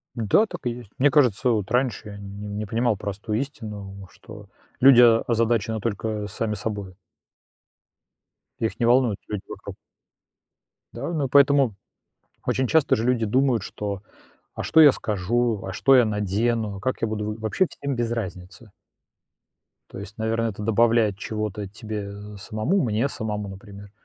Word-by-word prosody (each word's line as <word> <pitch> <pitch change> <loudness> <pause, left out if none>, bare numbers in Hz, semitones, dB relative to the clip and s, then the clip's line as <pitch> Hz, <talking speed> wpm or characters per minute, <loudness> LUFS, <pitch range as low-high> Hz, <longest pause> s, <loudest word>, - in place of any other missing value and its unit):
Да, 115 - +3
так 175 -3 -8
и 120 - +2
есть. 120 -4 -9
Мне 145 +2 +4
кажется, 125 -4 +3
вот 105 -4 -1
раньше 125 -4 0
я 100 - -8
нь 100 +1 -7
не 110 - -3
понимал 115 +1 +1
простую 100 +2 -3
истину, 100 -8 -7
что - - -13 0.3
люди 130 -2 +8 0.3
озадачены 115 -1 +1
только 105 0 -3
сами 105 +2 -3
собою. 100 -3 -5 1.6
Их 110 - -2
не 115 - +3
волнуют 120 -4 +3
люди 105 -2 -4
вокруг. - - -8 1.2
Да, 140 +8 -4
ну 150 -4 0
и - - -6
поэтому 140 -4 +4 0.7
очень 130 0 0
часто 160 0 +3
же 110 - -2
люди 125 -2 +2
думают, 125 0 +2
что: 100 -2 -5 0.5
"А - - -4
что 160 - +4
я 150 -3 +9
скажу? 110 +1 -1
А 95 - -4
что 135 +6 +4
я 125 - +6
надену? 105 +1 -1
А - - -9
как 130 +3 -2
я 115 - +1
буду 105 0 -3
в". - - -13
Вообще 110 - +1
всем 140 -2 -4
без 120 -1 -1
разницы. 95 -1 -6 1.2
То - - -9
есть, 105 +4 -9
наверно, 115 +1 0
это 105 0 -6
добавляет 115 -1 +3
чего-то 105 -1 -4
тебе, 105 0 -6
э, 105 0 -10
самому, 110 - -1
мне 115 +4 0
самому, 105 -6 -4
например, 100 +1 -11
110 Hz, 160 wpm, -24 LUFS, 105-120 Hz, 1.6 s, я